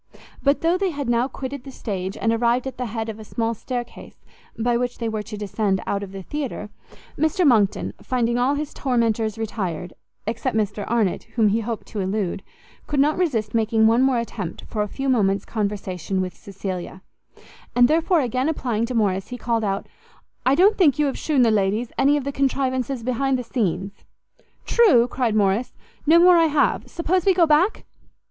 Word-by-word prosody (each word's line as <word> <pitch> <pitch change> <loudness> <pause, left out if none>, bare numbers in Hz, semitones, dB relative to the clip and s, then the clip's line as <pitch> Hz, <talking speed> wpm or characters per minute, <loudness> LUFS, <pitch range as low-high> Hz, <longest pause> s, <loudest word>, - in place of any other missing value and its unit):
But 280 +1 +2
though 340 +2 +2
they 390 -1 +1
had 285 -5 -4
now 240 +1 +2
quitted 270 -1 -6
the 275 - -9
stage, 195 -6 -5
and 225 0 +1
arrived 235 +2 +1
at 265 -2 -6
the 250 - -2
head 225 0 -4
of 220 -1 -6
a - - -8
small 225 +2 -2
stair 245 +2 -4
case 240 - -14 0.4
by 240 +1 +1
which 245 +1 -1
they 230 - -3
were 220 -1 -2
to 210 0 -8
descend 205 -1 -1
out 200 - -1
of 200 -2 -7
the 195 -1 -8
theatre, 260 -5 -5 0.5
Mr 315 +4 +2
Monckton, 215 -8 +3
finding 240 -1 0
all 265 +4 +2
his 295 0 -4
tormentors 230 -4 0
retired, 185 -6 -4 0.3
except 230 +2 -2
Mr 205 -1 -2
Arnott, 220 -6 0
whom 220 -3 +4
he 215 +3 +1
hoped 230 0 -4
to 215 - -5
elude, 190 -1 -2 0.5
could 290 - -1
not 295 +3 +3
resist 235 - -1
making 225 -1 +2
one 230 +3 +4
more 265 -1 +3
attempt 205 -7 -5
for 215 - -3
a 210 - 0
few 270 +6 -4
moments' 200 -6 +2
conversation 195 -4 -3
with 185 -1 -3
Cecilia; 190 -2 -6 0.7
and 245 0 +6
therefore, 325 +3 +2
again 255 +3 0
applying 235 -7 -1
to 250 - -4
Morrice, 195 -3 +1
he 250 - -6
called 230 -1 -1
out, 195 -1 -1 0.6
"I 265 - +5
don't 405 +6 +4
think 305 -7 +5
you 300 - +2
have 275 - -1
shewn 290 -5 +2
the 230 - +4
ladies 210 +3 0
any 285 +2 +4
of 290 - -3
the 280 - -3
contrivances 265 -2 -1
behind 260 +2 0
the 250 - -4
scenes?" 195 -4 -2 0.6
"True," 330 - +5
cried 240 -3 -1
Morrice, 205 +3 +1 0.3
"no 325 +2 +7
more 355 +1 +7
I 330 - +5
have; 295 -1 +1
suppose 350 +1 0
we 385 0 +3
go 345 -2 +5
back?" 320 +7 +2
235 Hz, 195 wpm, -23 LUFS, 210-275 Hz, 0.7 s, no